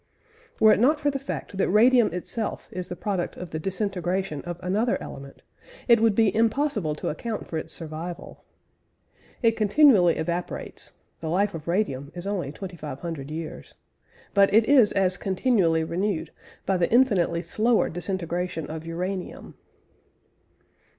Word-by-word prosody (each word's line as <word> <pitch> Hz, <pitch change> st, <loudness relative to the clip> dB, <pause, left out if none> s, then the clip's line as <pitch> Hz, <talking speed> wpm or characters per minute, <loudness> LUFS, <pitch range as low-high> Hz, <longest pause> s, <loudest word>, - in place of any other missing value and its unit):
Were 220 Hz, -1 st, +7 dB
it -, -, +1 dB
not 295 Hz, +6 st, +4 dB
for 290 Hz, -1 st, +1 dB
the 275 Hz, -, -3 dB
fact 270 Hz, -6 st, -6 dB
that -, -, +2 dB
radium 235 Hz, +2 st, +5 dB
itself 205 Hz, +5 st, -4 dB
is 180 Hz, 0 st, -5 dB
the 180 Hz, -, -4 dB
product 185 Hz, -1 st, -3 dB
of 180 Hz, -2 st, -8 dB
the 155 Hz, -, -3 dB
disintegration 190 Hz, -3 st, -2 dB
of 175 Hz, 0 st, -5 dB
another 210 Hz, +6 st, +1 dB
element, 140 Hz, 0 st, -10 dB, 0.4 s
it 235 Hz, -2 st, +6 dB
would 225 Hz, -2 st, +3 dB
be 220 Hz, -3 st, +3 dB
impossible 225 Hz, -, +1 dB
to -, -, -3 dB
account 220 Hz, +8 st, -4 dB
for 160 Hz, -, -3 dB
its 160 Hz, -, -8 dB
survival. 165 Hz, +2 st, -7 dB, 1.0 s
It 230 Hz, -, +6 dB
continually 215 Hz, -, +5 dB
evaporates 170 Hz, +2 st, -4 dB, 0.3 s
(the 160 Hz, -, -4 dB
life 200 Hz, +4 st, +1 dB
of 160 Hz, -1 st, -8 dB
radium 150 Hz, -7 st, -1 dB
is 175 Hz, +1 st, -6 dB
only 190 Hz, -8 st, -2 dB
2500 155 Hz, -4 st, -7 dB
years) 160 Hz, +1 st, -7 dB, 0.6 s
but 200 Hz, -1 st, +5 dB
it 220 Hz, +2 st, +5 dB
is 255 Hz, -6 st, +5 dB
as 185 Hz, -2 st, +1 dB
continually 190 Hz, -5 st, +1 dB
renewed 170 Hz, -1 st, -2 dB, 0.3 s
by 190 Hz, -, +1 dB
the 175 Hz, -1 st, 0 dB
infinitely 195 Hz, -9 st, +3 dB
slower 220 Hz, +6 st, +2 dB
disintegration 175 Hz, -2 st, -3 dB
of 160 Hz, 0 st, -6 dB
uranium. 180 Hz, +3 st, -5 dB
185 Hz, 145 wpm, -25 LUFS, 165-215 Hz, 1.0 s, Were